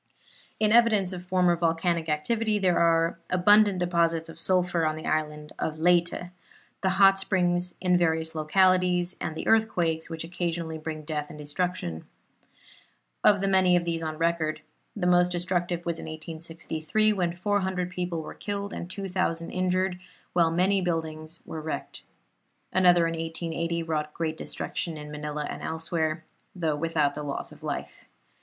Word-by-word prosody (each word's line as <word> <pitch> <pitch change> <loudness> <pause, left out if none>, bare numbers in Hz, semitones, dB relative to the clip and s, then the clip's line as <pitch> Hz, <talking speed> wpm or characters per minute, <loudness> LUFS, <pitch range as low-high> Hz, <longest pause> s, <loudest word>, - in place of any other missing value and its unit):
In 215 -1 +3
evidence 215 -5 +4
of 180 -1 -6
former 180 -1 +3
volcanic 165 0 0
activity 215 +8 0
are 170 -1 +3
the - - +1
abundant 205 +2 +5
deposits 170 -2 +1
of 165 - -11
sulphur 180 -2 +2
on 155 -1 +1
the 155 - -8
island 150 -1 -2
of 155 0 -2
Leyte, 175 +1 +2 0.5
the 190 - +2
hot 195 -1 +6
springs 180 -2 0
in 180 -1 +3
various 160 -1 +1
localities, 180 +2 +3
and 160 - -3
the - - -5
earthquakes 175 -8 +2
which 165 -1 -4
occasionally 165 -1 -3
bring 155 0 -5
death 150 -1 -3
and - - -10
destruction. 150 - -3 1.2
Of 205 -2 +5
the 195 - +1
many 190 -2 +4
of 175 -1 +1
these 165 -1 -1
on 155 -1 -4
record, 165 -2 0 0.3
the 200 -4 -2
most 180 0 +4
destructive 175 -1 -1
was 170 -1 -2
in - - -7
1863, 160 +5 -2
when 175 -3 -1
400 185 -2 -1
people 180 -2 -3
were - - -8
killed 200 0 -4
and 175 - -6
2,000 185 -4 -2
injured, 185 0 0 0.3
while 170 -2 +4
many 185 +4 +2
buildings 160 -2 -3
were 160 - -6
wrecked. 155 0 -5 0.7
Another 175 -2 +5
in 165 - 0
1880 165 +1 -3
wrought 150 -2 -3
great 160 -1 -2
destruction 165 0 -4
in 150 0 -8
Manila 150 0 -4
and - - -6
elsewhere, 160 0 -2 0.3
though 160 -4 0
without 150 -2 0
loss 140 -1 -4
of - - -15
life. - - -5
170 Hz, 155 wpm, -27 LUFS, 160-185 Hz, 1.2 s, hot